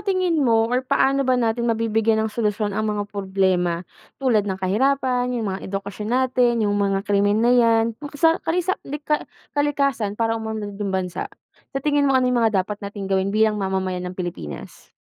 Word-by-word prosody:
tingin 370 -5 +1
mo 225 -4 +3
or 250 +2 0
paano 275 0 +1
ba 255 - +4
natin 235 0 0
mabibigyan 225 -1 +1
ng 215 - -3
solusyon 210 -2 -1
ang 215 +1 -1
mga 205 -1 -1
problema 190 -3 0 0.3
tulad 220 -7 +1
ng 190 - -2
kahirapan, 250 +6 +1
yung 215 -5 -2
mga 190 - -6
edukasyon 200 +2 -5
natin, 250 -2 +2
yung 205 - +1
mga 200 -1 0
krimen 205 +2 +2
na 245 - +5
yan, 230 -2 +4 0.2
makasa 315 +3 +1
kalisa 355 +3 0 0.2
lika 300 +1 -2 0.2
kalikasan 275 -8 0
para 225 0 0
umunlad 215 -2 -5
yung 200 - -1
bansa? 190 - -3 0.5
Sa 270 - -3
tingin 290 -1 +3
mo 265 - +4
ano 255 - +3
yung 240 - +2
mga 215 -5 +2
dapat 205 +1 -6
nating 200 -1 -5
gawin 190 0 +1
bilang 215 0 +2
mamamayan 185 -1 -2
ng 180 - -9
Pilipinas? 170 - -7
220 Hz, 180 wpm, -22 LUFS, 200-255 Hz, 0.5 s, na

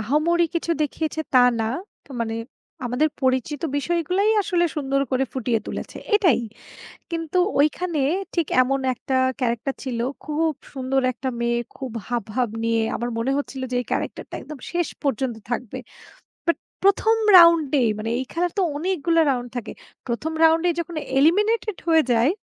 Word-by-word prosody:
আহামরি 305 +9 +2
কিছু 335 0 -1
দেখিয়েছে, 315 +2 -2
তা - - +8 0.2
না। 220 - 0 0.4
তা - - -24
মানে 225 -1 -1 0.5
আমাদের 250 +6 +1
পরিচিত 260 +3 0
বিষয়গুলাই 345 +7 +1
আসলে 360 -3 +1
সুন্দর 275 -2 0
করে 265 +1 +2
ফুটিয়ে 245 -3 0
তুলেছে। - - -6 0.2
এটাই। 360 - +4 0.7
কিন্তু 330 +1 -2 0.2
ঐখানে 310 +1 +1 0.3
ঠিক 335 -4 +1
এমন 270 +2 +1
একটা 260 +2 -3 0.2
ক্যারাক্টার 245 +2 -1
ছিল। 245 -3 -3 0.3
খুব 315 +1 0 0.2
সুন্দর 265 0 0
একটা 260 +2 -4
মেয়ে, 235 0 +1 0.2
খুব 265 -3 -6 0.2
হাবভাব 240 +1 -1 0.2
নিয়ে। 230 0 +2
আমার 240 +1 -2
মনে 235 +4 0
হচ্ছিল 275 -2 -4
যে, - - -1
এই - - -10
ক্যারাক্টারটা - - -3
একদম 305 - -9
শেষ 345 -1 0 0.2
পর্যন্ত 265 -3 0 0.2
থাকবে। 240 -2 -3 0.7
বাট 335 - +3 0.3
১ম 400 +3 +4 0.2
রাউন্ডে 320 -5 +6 0.2
মানে 220 +1 -3
এই 260 - -2
খেলার 350 +1 0
তো - - +4
অনেকগুলো 335 0 +1
রাউন্ড 245 -2 -2
থাকে। 235 - -4 0.4
১ম 290 +7 -2
রাউন্ডেই 325 +1 +4
যখন 340 +1 -6 0.2
eliminated 420 +7 +3
হয়ে 320 -1 +5
যায়। 235 +6 +4
285 Hz, 150 wpm, -23 LUFS, 250-335 Hz, 0.7 s, তা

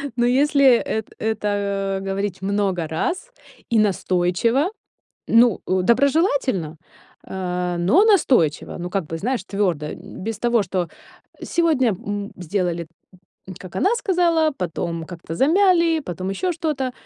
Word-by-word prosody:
Но 240 -1 +2
если 270 0 +4
эт 220 -1 -3
это 200 -2 -1
говорить 195 -1 -3
много 195 -4 -1
раз, 365 - -3 0.4
и 230 -2 +3
настойчиво, 200 - +1 0.6
ну, 230 -2 +4
э, 185 0 +1
доброжелательно, 255 - +1 0.5
э, 180 -1 -3
но 280 - +4
настойчиво, 250 - +2
ну, 175 +1 -4
как 195 -4 -2
бы, 165 - -4
знаешь, 245 +7 -2
твёрдо, 180 -7 -1
м, - - -10
без 220 -1 -4
того, 235 -3 +2
что 180 -1 -2 0.5
сегодня, 315 -8 +2
м, 205 +1 -4
сделали, 175 -2 -2 0.7
как 185 -2 -11
она 410 +6 +2
сказала, 340 -7 +2
потом 170 -1 -3
как-то 165 -2 -8
замяли, 335 - +3
потом 185 - -5
ещё 360 - -1
что-то. 300 -6 -2
205 Hz, 125 wpm, -22 LUFS, 180-280 Hz, 0.7 s, если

